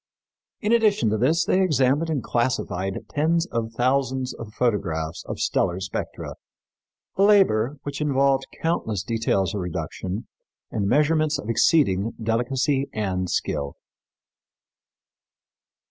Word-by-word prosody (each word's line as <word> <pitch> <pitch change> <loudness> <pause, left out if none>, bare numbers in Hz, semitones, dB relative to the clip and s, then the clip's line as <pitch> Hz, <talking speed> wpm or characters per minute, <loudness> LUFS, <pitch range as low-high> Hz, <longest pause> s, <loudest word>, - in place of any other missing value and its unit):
In 210 -1 0
addition 210 - +3
to 110 - +1
this 160 +7 +2
they 190 - +2
examined 150 -2 +2
and 145 -6 -1
classified 95 -6 -1
tens 165 +3 +1
of 115 -1 -2
thousands 130 +1 0
of 115 -2 -9
photographs 85 -9 -1
of - - -4
stellar 90 +1 0
spectra, 95 0 -5 0.8
a - - +2
labor 150 - +4
which 145 0 -5
involved 135 -2 +2 0.2
countless 110 - -1
details 110 -2 0
of 100 - -2
reduction 90 +3 -4 0.4
and 100 -2 -1
measurements 150 +4 +2
of 105 - -7
exceeding 115 - +3
delicacy 125 +5 0
and 95 -4 -2
skill. 70 -4 -2
125 Hz, 115 wpm, -24 LUFS, 105-150 Hz, 0.8 s, labor